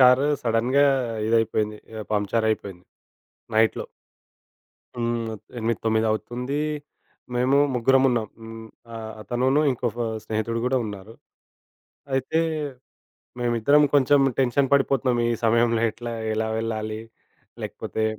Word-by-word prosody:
Car 130 Hz, +2 st, +6 dB, 0.2 s
సడెన్‌గా 125 Hz, +5 st, +3 dB, 0.4 s
ఇదైపోయింది. 110 Hz, -2 st, +1 dB, 0.2 s
ఆహ్, 105 Hz, -, -8 dB
పంచరైయిపోయింది. 105 Hz, -3 st, -1 dB, 0.7 s
నైట్‌లో. 110 Hz, 0 st, +2 dB, 1.1 s
హ్మ్. 115 Hz, -1 st, -1 dB, 0.3 s
8-9 110 Hz, -1 st, 0 dB
అవుతుంది, 125 Hz, +6 st, -2 dB, 0.7 s
మేము 130 Hz, +3 st, +3 dB, 0.2 s
ముగ్గురం 130 Hz, +2 st, +4 dB
ఉన్నాం. 115 Hz, -4 st, 0 dB
హ్మ్, 115 Hz, 0 st, -9 dB, 0.3 s
ఆహ్, 110 Hz, -1 st, -6 dB
అతనునూ 125 Hz, +6 st, +1 dB
ఇంకొక 120 Hz, -2 st, -3 dB, 0.3 s
స్నేహితుడు 110 Hz, +1 st, -2 dB
కూడా 130 Hz, +1 st, +2 dB
ఉన్నారు. 105 Hz, +1 st, -8 dB, 1.0 s
అయితే, 135 Hz, +5 st, +1 dB, 1.0 s
మేమిద్దరం 120 Hz, +5 st, +4 dB
కొంచెం 145 Hz, 0 st, +5 dB, 0.2 s
టెన్షన్ 135 Hz, +1 st, +2 dB
పడిపోతున్నాం. 135 Hz, -3 st, +2 dB
ఈ -, -, +1 dB
సమయంలో 115 Hz, 0 st, +3 dB
ఎట్లా, 120 Hz, +1 st, -7 dB, 0.2 s
ఎలా 110 Hz, 0 st, -1 dB
వెళ్ళాలి, 110 Hz, -1 st, -3 dB, 0.6 s
లేకపోతే 110 Hz, -, -3 dB
115 Hz, 100 wpm, -24 LUFS, 110-125 Hz, 1.1 s, Car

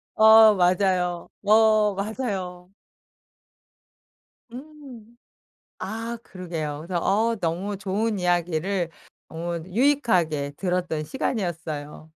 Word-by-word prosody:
어 220 Hz, 0 st, +8 dB
맞아요, 180 Hz, -1 st, +1 dB
어 215 Hz, -1 st, +4 dB
맞아요. 195 Hz, -4 st, -4 dB, 1.8 s
음. 250 Hz, -4 st, -12 dB, 0.6 s
아. 230 Hz, +3 st, -5 dB
그러게요. 160 Hz, -5 st, -6 dB
그래서 175 Hz, -2 st, -2 dB
어 225 Hz, +4 st, +1 dB
너무 190 Hz, +3 st, -3 dB
좋은 205 Hz, +2 st, -2 dB
이야기를 175 Hz, 0 st, 0 dB, 0.4 s
어 170 Hz, +1 st, -5 dB
유익하게 185 Hz, -, +1 dB
들었던 180 Hz, -4 st, -2 dB
시간이었어요. 160 Hz, -, -4 dB
190 Hz, 195 characters per minute, -24 LUFS, 175-220 Hz, 1.8 s, 어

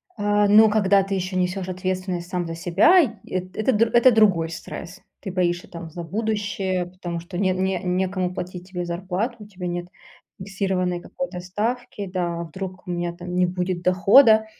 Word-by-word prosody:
А, 205 Hz, 0 st, +2 dB
ну, 215 Hz, +2 st, +7 dB
когда 200 Hz, -2 st, +3 dB
ты 195 Hz, +1 st, -4 dB
ещё 185 Hz, 0 st, -2 dB
несёшь 180 Hz, +1 st, -1 dB
ответственность 185 Hz, -1 st, -3 dB
сам 180 Hz, -2 st, -2 dB
за 165 Hz, -, -5 dB
себя, 190 Hz, -, +5 dB
и 300 Hz, -, +2 dB, 0.2 s
эт 185 Hz, 0 st, -4 dB
это, 220 Hz, +4 st, +1 dB
др 225 Hz, +2 st, +3 dB
это 240 Hz, +1 st, +7 dB
другой 190 Hz, -8 st, +3 dB
стресс. 180 Hz, +3 st, -8 dB, 0.2 s
Ты 190 Hz, -, -6 dB
боишься, 175 Hz, -1 st, 0 dB
там, 170 Hz, -1 st, -8 dB
за 170 Hz, +2 st, -7 dB
будущее, 205 Hz, -1 st, -2 dB
потому 175 Hz, -2 st, -6 dB
что 175 Hz, +1 st, -8 dB
не 190 Hz, -1 st, +2 dB
не 185 Hz, 0 st, 0 dB
некому 185 Hz, 0 st, -1 dB
платить 180 Hz, 0 st, -7 dB
тебе 180 Hz, -2 st, -4 dB
зарплату, 185 Hz, +7 st, -3 dB
у 210 Hz, -, -11 dB
тебя 185 Hz, -3 st, -6 dB
нет 175 Hz, 0 st, -4 dB, 0.5 s
фиксированной 190 Hz, -2 st, -2 dB
какой-то 230 Hz, -2 st, -6 dB
ставки. 210 Hz, +4 st, -3 dB
Да, 175 Hz, -2 st, -2 dB
а -, -, -3 dB
вдруг 185 Hz, +2 st, -8 dB
у -, -, -3 dB
меня 175 Hz, 0 st, -2 dB
там 180 Hz, +1 st, -7 dB
не 180 Hz, -, +3 dB
будет 180 Hz, 0 st, -2 dB
дохода. 215 Hz, +5 st, +6 dB
185 Hz, 185 wpm, -23 LUFS, 180-200 Hz, 0.5 s, ну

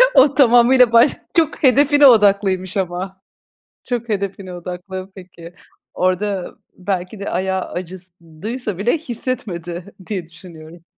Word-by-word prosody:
O 275 Hz, +1 st, +6 dB
tamamıyla 245 Hz, -1 st, +5 dB
baş 235 Hz, +5 st, +6 dB, 0.2 s
çok 320 Hz, -3 st, 0 dB
hedefine 285 Hz, +2 st, +5 dB
odaklıymış 200 Hz, -4 st, +3 dB
ama. 190 Hz, +1 st, -4 dB, 0.7 s
Çok 240 Hz, -1 st, -3 dB
hedefine 195 Hz, -2 st, -4 dB
odaklı 180 Hz, +2 st, -7 dB
peki. 175 Hz, -2 st, -13 dB, 0.4 s
Orada 185 Hz, +1 st, -1 dB, 0.2 s
belki 185 Hz, +1 st, -4 dB
de 200 Hz, -, -4 dB
ayağı 190 Hz, +1 st, -1 dB
acıdıysa 185 Hz, +4 st, -7 dB
bile 240 Hz, +10 st, +1 dB
hissetmedi 200 Hz, -, -5 dB
diye 185 Hz, -6 st, -4 dB
düşünüyorum. 165 Hz, -1 st, -14 dB
190 Hz, 110 wpm, -19 LUFS, 180-235 Hz, 0.7 s, O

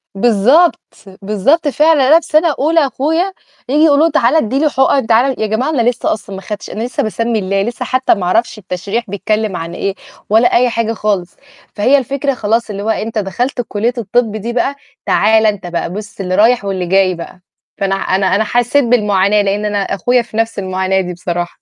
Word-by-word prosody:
بالضبط، 240 Hz, -, +3 dB, 0.4 s
بالضبط 215 Hz, -, +1 dB
فعلًا 295 Hz, -1 st, +3 dB
أنا 320 Hz, +3 st, +6 dB
في 320 Hz, -, -13 dB
سَنة 310 Hz, -1 st, +2 dB
أولى 320 Hz, +4 st, +2 dB
أخويا 320 Hz, +9 st, -1 dB, 0.4 s
ييجي 295 Hz, +3 st, +3 dB
يقولوا 305 Hz, 0 st, +4 dB
له 330 Hz, -, +1 dB
تعالَ 245 Hz, +5 st, +2 dB
ادّي 270 Hz, -2 st, +1 dB
لي 305 Hz, -, +2 dB
حُقَن 265 Hz, -3 st, +1 dB
تعالَ 245 Hz, +3 st, +2 dB
يا 220 Hz, -, +1 dB
جماعة 220 Hz, +7 st, -1 dB
أنا 245 Hz, -6 st, +2 dB
لسّه 245 Hz, -, -1 dB
أصلًا 200 Hz, -2 st, -8 dB
ما 190 Hz, -, -8 dB
خدتش، 210 Hz, +1 st, -7 dB
أنا 215 Hz, -, -4 dB
لسّه 245 Hz, -, -2 dB
باسمّي 230 Hz, +1 st, -1 dB
الله، 195 Hz, 0 st, -1 dB
لسّه 235 Hz, +4 st, -4 dB
حتى 260 Hz, 0 st, +2 dB
ما 185 Hz, -, -4 dB
أعرفش 220 Hz, +5 st, 0 dB
التشريح 200 Hz, +4 st, -4 dB
بيتكلّم 210 Hz, +1 st, -2 dB
عن 165 Hz, +1 st, -5 dB
إيه، 195 Hz, 0 st, -3 dB, 0.3 s
ولا 225 Hz, +3 st, +4 dB
أي 245 Hz, +1 st, +3 dB
حاجة 230 Hz, -1 st, -1 dB
خالص، 200 Hz, -5 st, -2 dB, 0.4 s
فهي 250 Hz, +7 st, +3 dB
الفكرة 275 Hz, +2 st, -1 dB
خلاص 230 Hz, -1 st, -1 dB
اللي 200 Hz, -1 st, -5 dB
هو 220 Hz, -, -2 dB
أنت 220 Hz, 0 st, -2 dB
دخلت 245 Hz, +6 st, -2 dB
كلية 225 Hz, +4 st, -1 dB
الطِبّ 230 Hz, 0 st, 0 dB
دي 230 Hz, +3 st, -4 dB
بقى، 270 Hz, +3 st, 0 dB, 0.3 s
تعالَ 220 Hz, 0 st, +3 dB
أنت 205 Hz, -4 st, -1 dB
بقى 175 Hz, 0 st, -3 dB
بُصّ 205 Hz, -1 st, -7 dB
اللي 185 Hz, -1 st, -2 dB
رايح 225 Hz, +1 st, +3 dB
واللي 190 Hz, -2 st, -2 dB
جاي 185 Hz, 0 st, +2 dB
بقى، 175 Hz, +2 st, -10 dB, 0.4 s
فأنا 195 Hz, -1 st, 0 dB
أنا 190 Hz, 0 st, 0 dB
أنا 215 Hz, -, +2 dB
حسّيت 245 Hz, +5 st, +1 dB
بالمعاناة 210 Hz, -4 st, +2 dB
لأن 205 Hz, +1 st, -1 dB
أنا 205 Hz, -1 st, -1 dB
أخويا 245 Hz, +6 st, 0 dB
في 225 Hz, -1 st, -9 dB
نَفْس 225 Hz, -2 st, -1 dB
المعاناة 190 Hz, 0 st, -1 dB
دي 180 Hz, -1 st, -5 dB
بصراحة. 175 Hz, 0 st, -4 dB
220 Hz, 200 wpm, -15 LUFS, 195-255 Hz, 0.4 s, أنا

